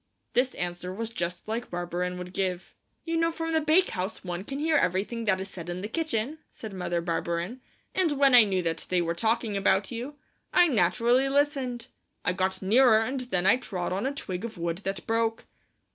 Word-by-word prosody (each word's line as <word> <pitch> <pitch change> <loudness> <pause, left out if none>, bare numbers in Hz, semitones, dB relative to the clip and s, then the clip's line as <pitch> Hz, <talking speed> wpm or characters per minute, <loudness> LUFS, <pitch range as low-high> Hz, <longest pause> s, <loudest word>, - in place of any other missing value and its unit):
This 255 +1 +2
answer 175 +1 -4
was 225 +4 -4
just 175 -3 -4
like 230 +3 -3
Barberin 175 +1 -3
would 180 0 -7
give. 185 -2 -2 0.3
"You 330 0 -1
know 330 0 +2
from 325 0 -3
the 320 - +3
bakehouse 310 - +1
one 180 0 -4
can 275 +6 -5
hear 310 +2 +1
everything 225 0 +1
that 190 -3 +2
is 190 - -4
said 175 -3 -8
in 175 +1 -4
the 205 - -3
kitchen," 295 +1 -2
said 220 -3 -9
Mother 175 -2 -2
Barberin, 170 +7 -2 0.3
"and 360 -5 +2
when 275 -2 +4
I 245 -2 +10
knew 190 -3 0
that 165 -1 -2
they 180 - +2
were 170 0 -1
talking 225 +3 0
about 195 0 +2
you, 245 +5 -5 0.4
I 355 -1 +6
naturally 235 - +3
listened. 270 -4 0 0.4
I 180 - +2
got 190 +1 -1
nearer 220 +2 +5
and 260 +4 -2
then 215 -8 -1
I 195 +6 +6
trod 185 -8 -3
on 200 +8 -1
a - - 0
twig 190 -9 -5
of 230 -4 -6
wood 170 0 -2
that 195 -1 -4
broke." 225 0 0
215 Hz, 200 wpm, -28 LUFS, 180-255 Hz, 0.4 s, I